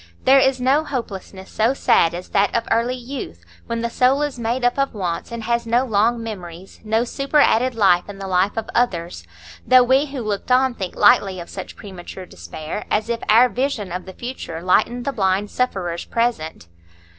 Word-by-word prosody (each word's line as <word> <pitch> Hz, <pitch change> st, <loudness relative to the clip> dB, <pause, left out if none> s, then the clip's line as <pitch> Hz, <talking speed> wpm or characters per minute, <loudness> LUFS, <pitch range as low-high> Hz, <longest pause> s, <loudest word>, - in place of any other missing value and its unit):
There 270 Hz, +1 st, +6 dB
is 265 Hz, -1 st, +2 dB
no 270 Hz, +5 st, +2 dB
hopelessness 195 Hz, -8 st, -6 dB
so 230 Hz, +5 st, +1 dB
sad 170 Hz, -9 st, +3 dB
as 180 Hz, +1 st, -8 dB
that 200 Hz, 0 st, +1 dB
of 230 Hz, -1 st, 0 dB
early 235 Hz, +3 st, +1 dB
youth, 245 Hz, -, -8 dB, 0.2 s
when 230 Hz, 0 st, -3 dB
the 235 Hz, -, -1 dB
soul 265 Hz, +4 st, +2 dB
is 285 Hz, -4 st, -4 dB
made 235 Hz, +2 st, -1 dB
up 245 Hz, +3 st, +1 dB
of 275 Hz, -4 st, 0 dB
wants, 180 Hz, -2 st, -3 dB
and 235 Hz, -1 st, -5 dB
has 235 Hz, +1 st, -1 dB
no 240 Hz, +3 st, +2 dB
long 230 Hz, +1 st, +1 dB
memories, 185 Hz, -4 st, -9 dB
no 220 Hz, +1 st, +1 dB
superadded 260 Hz, -2 st, +2 dB
life 190 Hz, -4 st, +3 dB
in 200 Hz, -, -8 dB
the 195 Hz, -, -7 dB
life 190 Hz, +3 st, +1 dB
of 225 Hz, -, -3 dB
others; 175 Hz, -, -1 dB, 0.4 s
though 255 Hz, -1 st, +6 dB
we 265 Hz, +4 st, +3 dB
who 275 Hz, -2 st, -6 dB
looked 210 Hz, +3 st, -3 dB
on 260 Hz, 0 st, +4 dB
think 190 Hz, -6 st, -6 dB
lightly 190 Hz, -2 st, +4 dB
of 170 Hz, -, -9 dB
such -, -, -8 dB
premature 185 Hz, -1 st, -10 dB
despair, 155 Hz, -, -7 dB
as 215 Hz, +2 st, 0 dB
if 235 Hz, -1 st, -2 dB
our 230 Hz, +4 st, +7 dB
vision 250 Hz, -6 st, -2 dB
of 180 Hz, +1 st, -5 dB
the 190 Hz, -, -8 dB
future 240 Hz, -9 st, -6 dB
lightened 230 Hz, +6 st, +1 dB
the 280 Hz, -, -1 dB
blind 195 Hz, -1 st, 0 dB
sufferer's 185 Hz, -9 st, -2 dB
present. 225 Hz, -, -2 dB
225 Hz, 190 wpm, -21 LUFS, 190-250 Hz, 0.4 s, our